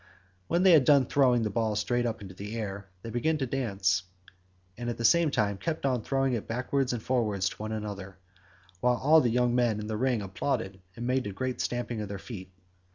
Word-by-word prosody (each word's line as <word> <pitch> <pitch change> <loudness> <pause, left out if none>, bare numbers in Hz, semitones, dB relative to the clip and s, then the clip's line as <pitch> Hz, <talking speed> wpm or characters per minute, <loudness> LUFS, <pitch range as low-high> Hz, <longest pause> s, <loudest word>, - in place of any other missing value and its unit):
When 175 +2 +2
they 190 - +7
had 155 -5 +7
done 140 -1 +5
throwing 125 -3 +3
the 105 - -1
ball 110 0 0
straight 120 +3 0
up 110 -3 -4
into 95 -1 -9
the 105 +4 -7
air 100 -3 -5
they 115 - -6
began 155 +7 +1
to 135 - -1
dance, 100 -9 0 0.7
and 120 0 -4
at 120 - -3
the 115 - -2
same 170 +6 +5
time 100 -6 0
kept 160 +2 -3
on 130 -3 +1
throwing 135 +2 0
it 115 - -3
backwards 125 +3 -1
and 120 -3 -4
forwards 105 -7 0
to - - -11
one 110 +1 -5
another, 100 -3 -5 0.6
while 125 +3 +2
all 155 +5 +5
the 120 - +2
young 120 +1 +2
men 120 -3 +2
in 105 - -5
the 110 0 -3
ring 125 -3 +1
applauded 95 0 -3
and 120 - -5
made 130 -2 0
a - - -4
great 130 +6 -3
stamping 120 -2 -2
with 105 -2 -4
their 100 - -4
feet. 95 -3 -9
120 Hz, 225 wpm, -29 LUFS, 105-130 Hz, 0.7 s, they